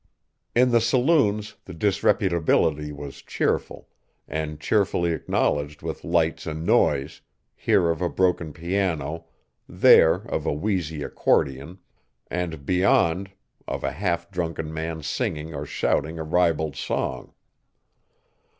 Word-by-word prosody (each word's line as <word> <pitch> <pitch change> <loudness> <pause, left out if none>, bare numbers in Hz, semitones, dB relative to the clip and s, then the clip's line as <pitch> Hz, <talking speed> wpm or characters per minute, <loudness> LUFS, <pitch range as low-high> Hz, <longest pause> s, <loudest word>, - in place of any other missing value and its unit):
In 125 +1 +4
the 115 -1 +4
saloons 115 -4 +2
the 90 - -9
disreputability 85 -5 +1
was 70 -1 -9
cheerful, - - -2 0.4
and 75 -1 -4
cheerfully 90 -1 +1
acknowledged 75 -2 -1
with - - -5
lights 85 -1 0
and 80 +1 -4
noise, 70 -5 +2 0.3
here 85 -1 +2
of 80 - -4
a 90 - +1
broken 90 -4 0
piano, 85 -2 -2 0.4
there - - +6
of - - -4
a - - +1
wheezy 80 -3 -2
accordion, 70 +8 0 0.5
and, 85 -5 -3
beyond, 90 +1 +2 0.4
of - - -4
a 70 - 0
half 85 +2 -2
drunken 80 -3 -3
man 80 0 -4
singing 80 - -3
or 70 0 -5
shouting 80 +4 -1
a 80 - -3
ribald 80 -3 +1
song. - - -3
85 Hz, 120 wpm, -24 LUFS, 75-95 Hz, 0.5 s, there